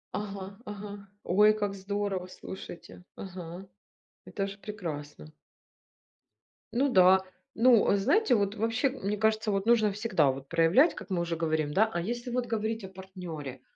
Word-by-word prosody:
Ага, 195 -1 -5
ага. 205 -1 -8 0.2
Ой, 210 +4 +5
как 205 -2 -2
здорово, 200 -1 -3
слушайте 180 -1 -10
Ага, 180 0 -8 0.6
это 195 -1 -3
же 195 0 -8
прекрасно. 155 -8 -7 1.4
Ну 270 +4 +2
да, 185 -2 +6 0.3
ну, 235 -1 +5
э, - - +4
знаете, 255 - +3
вот 200 -1 0
вообще, 230 +5 +1
мне 210 -6 -3
кажется, 220 +1 +1
вот 195 0 -1
нужно 225 -3 +4
всегда 195 - +2
вот 135 +1 -9
проявлять, 170 - +4
как - - -9
мы 180 -3 0
уже 170 -1 -2
говорим, 155 -2 -1
да, 220 +5 +4
а 175 - -2
если 240 +6 -4
вот 245 0 -1
говорить 225 -1 -2
о 190 - -7
партнере. 180 -8 -8
200 Hz, 155 wpm, -29 LUFS, 180-220 Hz, 1.4 s, да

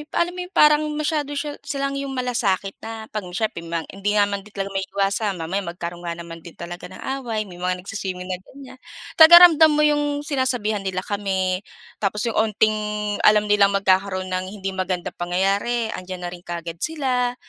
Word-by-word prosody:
alam 345 +1 +2
mo 360 0 -6
parang 300 0 +5
masyado 295 -1 -1
siya 290 +1 -4
silang 275 -2 -3
yung 275 -1 -4
malasakit 235 -7 0
na 225 0 -7
'pag 210 -3 -4
may 180 - -9
siyempre 215 -3 -1
may 165 0 -2
hindi 200 +2 -2
nga 205 - +5
din 205 - -1
naman 200 - -2
talaga 200 -1 -5
maiiwasan 195 +1 -1
mamaya 180 +5 -1
magkaroon 175 0 -6
nga 170 - -2
naman 170 0 -9
din 165 0 -13
talaga 175 +1 -8
ng 185 +1 -11 0.2
away, 225 -4 -2
may 180 -4 -12
mga 180 0 -2
nagswi-swimming 185 -3 -5
na 180 - -3
ganiyan. 260 +6 -14 0.4
Talagang 340 +2 +11
ramdam 315 0 +6
mo 300 - +3
yung 290 -1 +1
sinasabihan 255 -7 -1
nila 185 0 -2
kami 190 -3 -1 0.4
tapos 210 +1 -1
yung - - 0
onting 215 0 +2 0.5
alam 210 0 +6
nilang 200 -1 +4
magkakaroon 190 -1 +1
ng 185 0 -1
hindi 195 -1 -4
magandang 185 -2 -3
pangyayari, 200 +6 0
andiyan 185 -1 -8
na 175 - -4
rin 180 - -9
kaagad 170 -1 -5
sila, 255 - -1
200 Hz, 185 wpm, -22 LUFS, 185-260 Hz, 0.5 s, Talagang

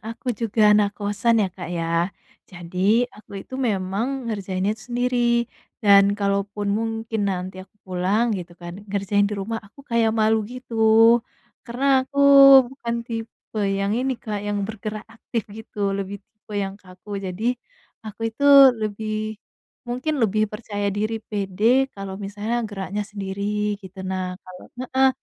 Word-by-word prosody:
aku 230 +4 -9
juga 215 -1 +4
anak 205 -1 +2
kosan 210 +2 +1
ya, - - -2
Kak, 175 -3 -8
ya. 165 +1 0 0.4
Jadi 185 +6 +1
aku 210 - -18
itu 260 - -10
memang 195 +3 -1 0.2
ngerjainnya 195 -2 -1
tuh 220 0 -12
sendiri 245 +1 0 0.7
dan 200 -1 +7
kalaupun 200 +1 -1
mungkin 225 -1 -3
nanti 185 0 -4
aku 210 - -39
pulang 185 +4 +1
gitu 175 -1 -9
kan, 175 0 -8 0.2
ngerjain 200 0 +1
di 210 - -3
rumah 225 +3 -3
aku 225 - -17
kayak 230 -1 +3
malu 220 0 +4
gitu. 255 -1 -10 0.9
Karena 245 +3 -4 0.2
aku 280 +2 -7 0.5
bukan 235 -3 -4
tipe 225 -1 -7 0.2
yang 200 +1 0
ini, 260 +1 0
Kak, 210 -3 -5
yang 205 0 -1
bergerak 215 0 -6
aktif 230 -1 -4
gitu 205 -2 -3
lebih 200 0 -4
tipe 215 -1 -18
yang 195 0 -6
kaku. 195 +2 -8
Jadi 185 +5 -5 0.6
aku 215 +1 -9
itu 280 +5 -3 0.4
lebih 215 0 -3 0.5
mungkin 255 +6 -2
lebih 215 0 +2
percaya 205 -2 -4
diri, 215 +2 -1
pede 215 +7 +1
kalau 195 -1 -7
misalnya 210 +4 -3
geraknya 200 +1 -4
sendiri 200 -1 -5 0.4
gitu, 190 +1 -12
nah 185 0 -2 0.2
kalo 185 -1 -13 0.2
heeh. 265 +1 +3
210 Hz, 145 wpm, -23 LUFS, 195-225 Hz, 0.9 s, dan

